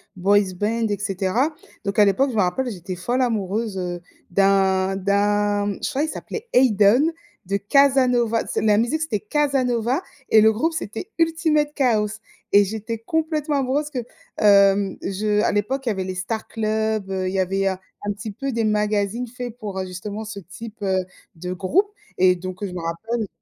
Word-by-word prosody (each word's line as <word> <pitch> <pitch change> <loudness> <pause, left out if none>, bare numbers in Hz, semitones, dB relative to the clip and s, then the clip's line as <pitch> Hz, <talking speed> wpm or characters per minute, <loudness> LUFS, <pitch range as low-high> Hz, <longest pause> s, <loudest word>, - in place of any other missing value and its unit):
boys 195 +1 +2
band 225 +2 0
et 205 - -1
cetera. 200 - 0 0.3
Donc 200 +1 -1
à 210 - +8
l'époque, 260 +8 +2
je - - -6
me 210 - +3
rappelle, 245 +8 0
j'étais 185 -1 -6
folle 240 +9 -1
amoureuse, 215 -3 -1
heu, 175 -1 -3 0.3
d'un 195 0 +3
d'un 205 +1 +1
je - - 0
crois, 280 - -1
il - - 0
s'appelait 450 +8 -6
Ayden 245 +4 +5 0.3
de 200 +2 0
Casanova. 250 -1 +3
C'est - - -2
la 210 -1 +4
musique, 270 +8 0
c'était 305 -10 -1
Casanova 255 - 0 0.3
et 220 - +7
le 220 +1 +6
groupe, 315 +10 0
c'était 320 - -5
Ultimate 320 -3 +2
Kaos 215 -5 +1 0.3
et 205 0 +7
j'étais 220 +3 -4
complètement 305 +4 -1
amoureuse 280 +3 -1
que, 260 - -3 0.4
hem, 200 -1 +4
je 210 +2 0
à - - +2
l'époque 260 +7 -1
il - - +1
y - - +2
avait 190 -2 -2
les 185 0 -4
Star 220 +5 -4
Club, 220 -2 -1
heu, 190 -1 -1
il 185 - -3
y - - +1
avait 195 +1 +1
un 190 -1 0 0.4
petit 205 +2 -7
peu 275 +7 -4
des 230 -2 -1
magazines 210 +2 0
faits 245 -1 -7
pour, 205 -4 -5
heu, 190 - -2
justement 200 +4 -6
ce 210 -1 -7
type, 215 +5 -11
heu, 190 -2 0 0.3
de 180 +2 -5
groupe 335 - +1 0.3
et 180 0 +5
donc, 185 +2 -7
heu, - - -1
je 180 - -8
me 180 - -5
rappelle 215 +7 -3
210 Hz, 185 wpm, -22 LUFS, 195-250 Hz, 0.4 s, à